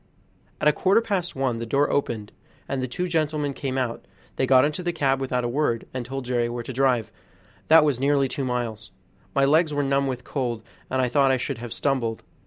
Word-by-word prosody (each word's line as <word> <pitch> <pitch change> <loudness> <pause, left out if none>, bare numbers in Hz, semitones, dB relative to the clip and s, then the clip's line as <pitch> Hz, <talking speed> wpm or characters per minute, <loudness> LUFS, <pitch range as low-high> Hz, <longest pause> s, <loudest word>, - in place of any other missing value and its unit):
At - - +2
a 150 - +6
quarter 195 +4 +3
past 195 -6 -2
one 130 -3 -1
the 115 - -3
door 140 +5 +2
opened, 110 -7 -1 0.4
and 135 -1 -2
the 130 - -2
two 180 +9 -3
gentlemen 155 -4 0
came 135 -1 -3
out; 125 -3 -3 0.3
they 130 - 0
got 130 0 +6
into 150 +4 -2
the 175 -1 -1
cab 135 -5 +1
without 125 -2 -1
a - - 0
word, 120 -2 0
and 130 -1 -3
told 135 +1 -5
Jerry 120 -1 0
where 120 0 -4
to 130 - -6
drive, 125 -4 +1 0.6
that 160 0 +7
was 140 -5 +1
nearly 140 0 +2
two 140 +1 -3
miles. 120 -4 -3 0.5
My 140 0 +4
legs 155 +1 +3
were 145 - +1
numb 140 0 +1
with 125 -2 -4
cold, 120 -5 -3 0.3
and 130 0 +1
I - - +2
thought 135 +2 +3
I 130 - +3
should 125 - -4
have 120 -1 -7
stumbled. 120 -5 -1
135 Hz, 220 wpm, -24 LUFS, 120-145 Hz, 0.6 s, that